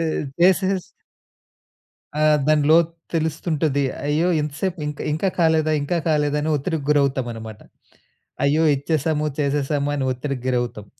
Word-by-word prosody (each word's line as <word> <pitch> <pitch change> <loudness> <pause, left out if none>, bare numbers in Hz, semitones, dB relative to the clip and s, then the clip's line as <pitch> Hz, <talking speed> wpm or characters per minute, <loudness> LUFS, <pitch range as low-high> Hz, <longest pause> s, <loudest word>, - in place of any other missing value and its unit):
ఈ - - 0 0.4
this 190 +1 +5
is 185 -2 -2 1.3
ఆ! - - -1 0.3
దాని 155 -1 +3
లోతు 165 0 +4 0.2
తెలుస్తుంటుంది. 155 -2 0 0.2
అయ్యో! 155 +4 +1
ఇంత 150 -1 -3
సేపు 185 -4 -2
ఇంకా 150 -1 -5
ఇంకా 175 +5 0
కాలేదా, 160 -2 +3
ఇంకా 170 +4 -1
కాలేదా 150 -1 +1
అని 155 - -1
ఒత్తిడికి 150 0 -3
గురవుతాం 140 -3 +2
అనమాట. 110 -2 -9 0.8
అయ్యో! 150 +3 +3
ఇచ్చేసాము, 155 +1 -1
చేసేసాము 145 0 0
అని 140 - -1
ఒత్తిడికి 130 0 -4
గురవుతాం. 120 -4 -2
150 Hz, 135 wpm, -22 LUFS, 140-160 Hz, 1.3 s, this